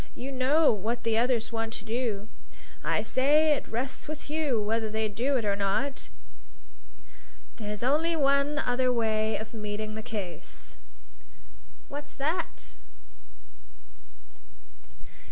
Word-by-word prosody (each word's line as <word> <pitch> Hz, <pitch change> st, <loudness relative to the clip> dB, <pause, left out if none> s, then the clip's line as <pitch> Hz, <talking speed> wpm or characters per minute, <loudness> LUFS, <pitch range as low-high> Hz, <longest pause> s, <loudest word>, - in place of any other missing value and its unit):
You 265 Hz, +3 st, -5 dB
know 275 Hz, +4 st, +4 dB
what 220 Hz, +4 st, -2 dB
the 225 Hz, -1 st, +2 dB
others 240 Hz, -2 st, +1 dB
want 225 Hz, 0 st, -2 dB
to 200 Hz, -, -8 dB
do. 225 Hz, -3 st, -1 dB, 0.6 s
I -, -, +1 dB
say 300 Hz, +4 st, +4 dB
it -, -, -3 dB
rests 250 Hz, +4 st, -3 dB
with 305 Hz, -1 st, -6 dB
you 300 Hz, -7 st, +1 dB
whether 220 Hz, +1 st, 0 dB
they 220 Hz, 0 st, 0 dB
do 245 Hz, +7 st, +1 dB
it 230 Hz, -, -1 dB
or 200 Hz, -1 st, +2 dB
not. 200 Hz, +8 st, -1 dB, 1.5 s
There's 210 Hz, -1 st, -4 dB
only 310 Hz, +6 st, +3 dB
one 280 Hz, 0 st, +3 dB
other 255 Hz, -3 st, +2 dB
way 220 Hz, -2 st, +1 dB
of 220 Hz, +1 st, -7 dB
meeting 215 Hz, 0 st, -4 dB
the 220 Hz, -, -4 dB
case." 195 Hz, -7 st, -5 dB, 1.1 s
"What's 290 Hz, +1 st, -7 dB
that?" 315 Hz, +5 st, -3 dB
240 Hz, 120 wpm, -29 LUFS, 215-280 Hz, 1.5 s, know